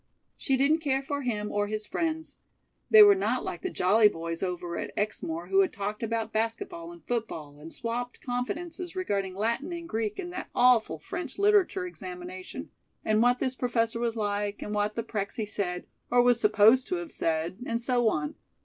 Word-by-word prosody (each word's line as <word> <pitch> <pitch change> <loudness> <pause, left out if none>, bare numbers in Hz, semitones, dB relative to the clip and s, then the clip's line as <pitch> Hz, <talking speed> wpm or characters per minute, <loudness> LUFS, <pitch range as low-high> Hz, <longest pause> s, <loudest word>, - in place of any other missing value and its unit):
She 270 -2 0
didn't 290 +5 +3
care 275 -3 0
for 285 +1 -3
him 210 -5 -2
or 205 0 0
his 215 0 -4
friends. 320 +3 -3 0.5
They 435 -1 +10
were 410 -1 +8
not 385 - 0
like - - -5
the 370 - -2
jolly 210 - +5
boys 165 -3 -4
over 175 -2 -3
at - - -4
Exmoor, 175 -4 -2
who 195 0 +5
talked 205 0 -5
about 225 -1 -2
basket 225 - -1
ball 340 -1 -8
and 345 -1 -14
football, 160 -12 -4
and 160 +2 -10
swopped 240 +4 -4
confidences 330 +9 -4
regarding 200 - -1
Latin 235 - -1
and 340 -1 -5
Greek 220 -6 -2
and 355 -2 -5
that 365 - -5
awful 245 -9 +4
French 295 - -6
Literature 400 -2 +3
examination, 185 - -8 0.3
and 215 0 +3
what 245 +1 +4
this 255 0 -1
professor 230 -2 0
was 235 -1 -1
like, 205 -1 -2
and 210 - -5
what 210 +1 0
the 230 - -2
Prexy 210 +1 -3
said 180 -4 -3 0.2
or 245 0 +5
was 245 -1 +4
supposed 215 +4 +5
to 365 - -1
have 345 -2 -5
said, 165 +2 -1
and 230 0 0
so 240 -1 +2
on. 150 -6 -2
230 Hz, 185 wpm, -28 LUFS, 205-280 Hz, 0.5 s, They